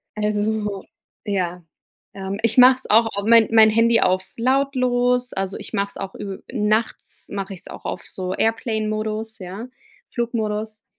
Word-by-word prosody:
Also, 210 Hz, -1 st, -1 dB, 0.4 s
ja, 180 Hz, -3 st, -2 dB, 0.5 s
ähm, 195 Hz, +1 st, -5 dB
ich 230 Hz, +2 st, +3 dB
mache 255 Hz, +1 st, +9 dB
es -, -, -6 dB
auch 225 Hz, +2 st, +6 dB
au 200 Hz, 0 st, -3 dB
mein 230 Hz, -1 st, +6 dB
mein 220 Hz, -1 st, +7 dB
Handy 230 Hz, +1 st, +4 dB
auf 185 Hz, +1 st, +2 dB
lautlos, 250 Hz, -1 st, +1 dB
also 195 Hz, 0 st, -3 dB
ich -, -, -9 dB
mache 200 Hz, -1 st, 0 dB
es -, -, -7 dB
auch 195 Hz, 0 st, -6 dB
ü 195 Hz, -2 st, -7 dB
nachts 220 Hz, -1 st, -1 dB
mach 195 Hz, -1 st, -4 dB
ich's 190 Hz, -3 st, -9 dB
auch -, -, -10 dB
auf 175 Hz, -, -4 dB
so 185 Hz, -1 st, -3 dB
Airplane 225 Hz, -1 st, 0 dB
Modus, 215 Hz, +1 st, -3 dB
ja, 195 Hz, +6 st, -7 dB, 0.5 s
Flugmodus, 220 Hz, -2 st, -3 dB
215 Hz, 160 wpm, -22 LUFS, 200-230 Hz, 0.5 s, mache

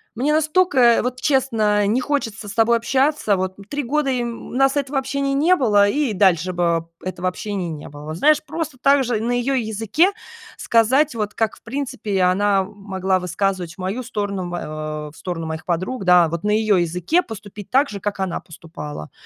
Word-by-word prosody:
мне 280 Hz, +6 st, +1 dB
настолько 305 Hz, -7 st, +4 dB
вот, 250 Hz, 0 st, -3 dB
честно, 225 Hz, -7 st, +2 dB
не 235 Hz, +5 st, +1 dB
хочется 225 Hz, -7 st, -3 dB
с -, -, -6 dB
тобой 230 Hz, +1 st, +3 dB
общаться. 260 Hz, -3 st, +1 dB
Вот 185 Hz, 0 st, -2 dB
3 290 Hz, -1 st, -2 dB
года 285 Hz, +2 st, 0 dB
и, 250 Hz, -2 st, 0 dB
м, 235 Hz, -1 st, -5 dB
у -, -, -11 dB
нас 270 Hz, +1 st, +3 dB
этого 275 Hz, -1 st, 0 dB
общения 275 Hz, +1 st, -2 dB
не 325 Hz, +7 st, +4 dB
было, 205 Hz, -, +4 dB
и 280 Hz, +2 st, 0 dB
дальше 185 Hz, -3 st, +2 dB
бы 170 Hz, -2 st, 0 dB, 0.2 s
этого 185 Hz, -1 st, -3 dB
общения 190 Hz, -2 st, -4 dB
не 150 Hz, -2 st, -7 dB
было". 145 Hz, 0 st, -11 dB
Вот 155 Hz, +1 st, -5 dB
знаешь, 305 Hz, -, +4 dB
просто 315 Hz, -2 st, -5 dB
так 275 Hz, -1 st, +4 dB
же 230 Hz, -3 st, 0 dB
на 235 Hz, +2 st, -1 dB
её 245 Hz, +3 st, 0 dB
языке 225 Hz, -, +1 dB, 0.5 s
сказать, 255 Hz, +5 st, +2 dB
вот 210 Hz, -2 st, -3 dB
как, 225 Hz, -2 st, 0 dB
в -, -, -21 dB
принципе, 230 Hz, -6 st, -3 dB
она 195 Hz, +2 st, +3 dB
могла 190 Hz, -2 st, -2 dB
высказывать 180 Hz, -1 st, -2 dB
в -, -, -42 dB
мою 195 Hz, +7 st, -3 dB
сторону, 200 Hz, -6 st, -3 dB
в, -, -, -7 dB
э, 155 Hz, -1 st, -5 dB
в -, -, -20 dB
сторону 170 Hz, -2 st, -5 dB
моих 160 Hz, 0 st, -5 dB
подруг, 185 Hz, +6 st, -2 dB
да, 180 Hz, -2 st, +6 dB
вот, 170 Hz, +2 st, -4 dB
на 210 Hz, -, +1 dB
её 215 Hz, -1 st, +3 dB
языке 180 Hz, -, +1 dB
поступить 210 Hz, -, -10 dB
так 275 Hz, +3 st, +3 dB
же, 200 Hz, -2 st, -6 dB
как 205 Hz, 0 st, -3 dB
она 190 Hz, -2 st, -2 dB
поступала. 150 Hz, -, -9 dB
210 Hz, 195 wpm, -21 LUFS, 185-265 Hz, 0.5 s, да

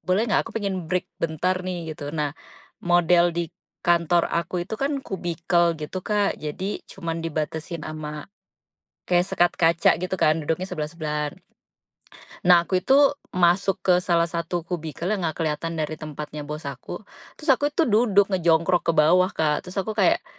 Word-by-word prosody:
boleh 195 Hz, +5 st, +3 dB
gak -, -, +3 dB
aku -, -, -8 dB
pengen 190 Hz, -6 st, -3 dB
break 180 Hz, +1 st, 0 dB, 0.2 s
bentar 180 Hz, +3 st, 0 dB
nih 175 Hz, -3 st, -4 dB
gitu. 145 Hz, -1 st, -7 dB
Nah, 150 Hz, -2 st, -1 dB, 0.5 s
model 175 Hz, 0 st, +4 dB
di 170 Hz, 0 st, -3 dB, 0.3 s
kantor 170 Hz, 0 st, +3 dB
aku 170 Hz, +1 st, -1 dB
itu 220 Hz, -, -5 dB
kan 275 Hz, 0 st, 0 dB
kubikel 170 Hz, -2 st, 0 dB
gitu, 155 Hz, +5 st, -5 dB
Kak, 205 Hz, +1 st, 0 dB
jadi 180 Hz, +7 st, -4 dB
cuman 165 Hz, -3 st, -4 dB
dibatasin 160 Hz, +1 st, -4 dB
sama 150 Hz, -1 st, -6 dB, 0.9 s
kayak 175 Hz, 0 st, +4 dB
sekat 175 Hz, -2 st, +2 dB
kaca 165 Hz, 0 st, +4 dB
gitu 185 Hz, +1 st, -2 dB
kan 155 Hz, +1 st, +4 dB
duduknya 165 Hz, +4 st, -2 dB
sebelah-sebelahan. 150 Hz, -2 st, -3 dB, 1.2 s
Nah, 175 Hz, -1 st, +7 dB
aku 185 Hz, +1 st, 0 dB
itu 265 Hz, +8 st, +4 dB, 0.4 s
masuk 185 Hz, +2 st, +3 dB
ke 180 Hz, -, +5 dB
salah 170 Hz, -2 st, +2 dB
satu 170 Hz, 0 st, -3 dB
kubikel 165 Hz, -3 st, -5 dB
yang 200 Hz, -, -1 dB
ga 160 Hz, -, -2 dB
keliatan 165 Hz, +1 st, -2 dB
dari 155 Hz, 0 st, -2 dB
tempatnya 150 Hz, 0 st, -6 dB
bos 150 Hz, +1 st, -6 dB
aku. 140 Hz, -, -7 dB, 0.3 s
Terus 305 Hz, -1 st, -1 dB
aku 285 Hz, +3 st, +1 dB
itu 320 Hz, +2 st, +1 dB
duduk 205 Hz, -3 st, +3 dB
ngejongkrok 170 Hz, 0 st, +2 dB
ke -, -, +5 dB
bawah, 180 Hz, +5 st, +5 dB
Kak. 155 Hz, -2 st, -1 dB
Terus 185 Hz, -, -10 dB
aku 195 Hz, +3 st, -1 dB
kayak 200 Hz, -5 st, +2 dB
170 Hz, 160 wpm, -24 LUFS, 160-185 Hz, 1.2 s, Nah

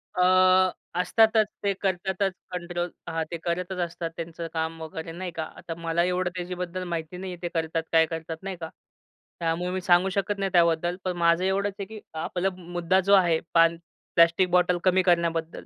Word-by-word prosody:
अ, 180 Hz, -, +1 dB, 0.8 s
असतातच 220 Hz, +3 st, +4 dB, 0.2 s
ते 200 Hz, -1 st, +2 dB
करतातच 190 Hz, 0 st, 0 dB, 0.2 s
कंट्रोल 175 Hz, 0 st, -3 dB, 0.2 s
हां, 165 Hz, 0 st, -1 dB
ते 170 Hz, -, -3 dB
करतच 180 Hz, +2 st, -2 dB
असतात 170 Hz, -1 st, -5 dB
त्यांचं 165 Hz, 0 st, -6 dB
काम 160 Hz, 0 st, -3 dB
वगैरे, 160 Hz, +1 st, -6 dB
नाही 175 Hz, +1 st, -5 dB
का. 165 Hz, -1 st, -4 dB
आता 165 Hz, -, -6 dB
मला 170 Hz, 0 st, 0 dB
एवढं 180 Hz, 0 st, 0 dB
त्याच्याबद्दल 180 Hz, 0 st, -4 dB
माहिती 170 Hz, 0 st, -4 dB
नाही 185 Hz, 0 st, -5 dB
आहे 175 Hz, -, -11 dB
ते 175 Hz, -, -2 dB
करतात, 165 Hz, 0 st, -1 dB
काय 160 Hz, -1 st, +5 dB
करतात, 160 Hz, 0 st, -5 dB
नाही 195 Hz, -1 st, -4 dB
का. 160 Hz, -, -4 dB, 0.7 s
त्यामुळे 170 Hz, +2 st, -1 dB
मी 185 Hz, 0 st, -2 dB
सांगू 180 Hz, +2 st, +4 dB
शकत 200 Hz, +1 st, -1 dB
नाही 195 Hz, -1 st, -1 dB
त्याबद्दल, 170 Hz, 0 st, +3 dB
पण 185 Hz, -1 st, -2 dB
माझं 170 Hz, +1 st, +3 dB
एवढंच 195 Hz, +1 st, 0 dB
आहे 200 Hz, -, -3 dB
की 215 Hz, +1 st, -9 dB, 0.2 s
आपला 185 Hz, +1 st, -1 dB
मुद्दा 175 Hz, +1 st, 0 dB
जो 195 Hz, +2 st, +2 dB
आहे 175 Hz, -4 st, +5 dB
पान 165 Hz, 0 st, +5 dB, 0.4 s
प्लास्टिक 170 Hz, +2 st, +5 dB
बॉटल 180 Hz, 0 st, +3 dB
कमी 185 Hz, 0 st, +4 dB
करण्याबद्दल, 170 Hz, -2 st, 0 dB
175 Hz, 180 wpm, -26 LUFS, 165-185 Hz, 0.8 s, काय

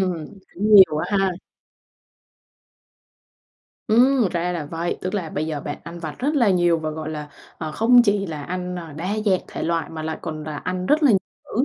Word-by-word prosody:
Ừm, 180 Hz, -4 st, -1 dB, 0.3 s
cũng 210 Hz, +3 st, +2 dB
nhiều 190 Hz, -6 st, +8 dB
á 180 Hz, +6 st, -1 dB
ha. 195 Hz, 0 st, +2 dB, 2.6 s
Ừm, 245 Hz, 0 st, +4 dB
ra 175 Hz, 0 st, -1 dB
là 165 Hz, -4 st, -4 dB
vậy, 165 Hz, +3 st, -3 dB
tức 185 Hz, +3 st, -4 dB
là 175 Hz, -6 st, -3 dB
bây 155 Hz, +2 st, -2 dB
giờ 155 Hz, -2 st, -3 dB
bạn 145 Hz, +1 st, -5 dB
ăn 170 Hz, +1 st, -8 dB
vặt 155 Hz, -3 st, -5 dB
rất 290 Hz, +4 st, 0 dB
là 235 Hz, -7 st, +4 dB
nhiều 175 Hz, -2 st, +3 dB
và, 155 Hz, -1 st, -3 dB
gọi 155 Hz, 0 st, -5 dB
là, 150 Hz, -1 st, -6 dB, 0.3 s
ờ, 155 Hz, -2 st, -4 dB
không 240 Hz, +7 st, +5 dB
chỉ 205 Hz, -3 st, +1 dB
là 155 Hz, -4 st, -5 dB
ăn, 180 Hz, +2 st, -4 dB
ờ, 165 Hz, -4 st, -8 dB
đa 165 Hz, +5 st, -5 dB, 0.2 s
dạng 190 Hz, -3 st, +3 dB
thể -, -, -6 dB
loại, 165 Hz, -1 st, -1 dB
mà 160 Hz, -1 st, -6 dB
lại 160 Hz, 0 st, -4 dB
còn 155 Hz, -1 st, -5 dB
là 150 Hz, -1 st, -5 dB
ăn 180 Hz, +3 st, -3 dB
rất 305 Hz, +7 st, +3 dB
là 285 Hz, -, +6 dB
nhiều 200 Hz, -, +5 dB, 0.3 s
cữ, 245 Hz, -, 0 dB
175 Hz, 210 wpm, -22 LUFS, 155-200 Hz, 2.6 s, nhiều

